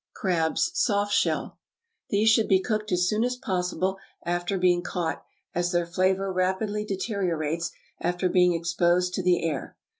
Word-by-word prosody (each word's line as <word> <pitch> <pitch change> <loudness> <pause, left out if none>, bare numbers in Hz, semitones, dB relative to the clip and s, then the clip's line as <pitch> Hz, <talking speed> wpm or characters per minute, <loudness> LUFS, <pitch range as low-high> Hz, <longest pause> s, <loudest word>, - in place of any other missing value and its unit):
=Crabs, 175 - 0
Soft 205 -10 +1
shell.= - - 0 0.5
These 210 +2 +3
should 220 0 +3
be 190 -2 +4
cooked 215 +1 -2
as 180 0 +2
soon 215 +4 +1
as 250 +1 0
possible 185 -3 -2 0.3
after 175 +3 -1
being 180 -1 +3
caught, 175 -2 -3 0.3
as 175 0 0
their 175 -1 +1
flavor 185 +2 0
rapidly 190 +3 0
deteriorates 175 -6 -2 0.3
after 175 +1 0
being 180 -1 +4
exposed 175 +2 +1
to 190 - -1
the 180 -1 +2
air. 145 -4 -4
185 Hz, 150 wpm, -26 LUFS, 175-200 Hz, 0.5 s, be